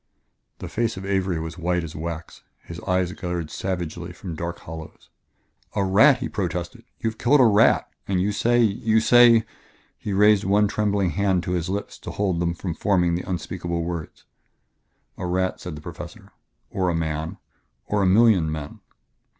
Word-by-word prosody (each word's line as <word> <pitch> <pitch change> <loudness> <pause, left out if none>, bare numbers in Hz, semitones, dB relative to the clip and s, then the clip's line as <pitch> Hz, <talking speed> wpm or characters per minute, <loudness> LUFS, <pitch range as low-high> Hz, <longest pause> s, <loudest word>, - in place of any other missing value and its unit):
The - - -7
face 115 -3 -1
of 95 - -6
Avery 95 -3 0
was 80 +2 -6
white 90 0 0
as 80 -1 -8
wax; 85 +1 -6 0.2
his 85 0 -8
eyes 90 -1 +1
glared 90 -4 -4
savagely 90 -2 -4
from 85 +1 -7
dark 85 +2 -4
hollows. 80 0 -10 0.6
"A 100 - +1
rat!" 120 +9 +6
he 125 -1 -3
protested. 90 -3 -4 0.2
"You 110 - 0
have 110 - -19
killed 140 +4 +4
a 130 - +7
rat... 110 0 +4 0.2
and 95 -2 +1
you 100 +3 +1
say 120 +4 +2
you 110 +1 +2
say 120 0 +6 0.3
" - - -35
He 105 - -3
raised 105 +1 +4
one 105 +2 +3
trembling 100 -3 0
hand 95 0 +1
to - - -3
his 90 -1 -1
lips 100 +2 -4
to - - -8
hold 95 -4 -1
them 85 0 0
from 90 -1 -4
forming 90 -2 +1
the 90 +2 -3
unspeakable 85 -1 -3
words. 85 -2 -6 0.9
"A 90 - -3
rat," 95 +1 -1
said 90 -3 -7
the 75 - -9
Professor 90 +4 -9 0.4
"or 95 -2 0
a 85 - 0
man... 80 -1 -3 0.5
or 105 -1 0
a 95 - +3
million 95 -5 +4
men." 75 -2 -6
90 Hz, 180 wpm, -24 LUFS, 85-105 Hz, 0.9 s, a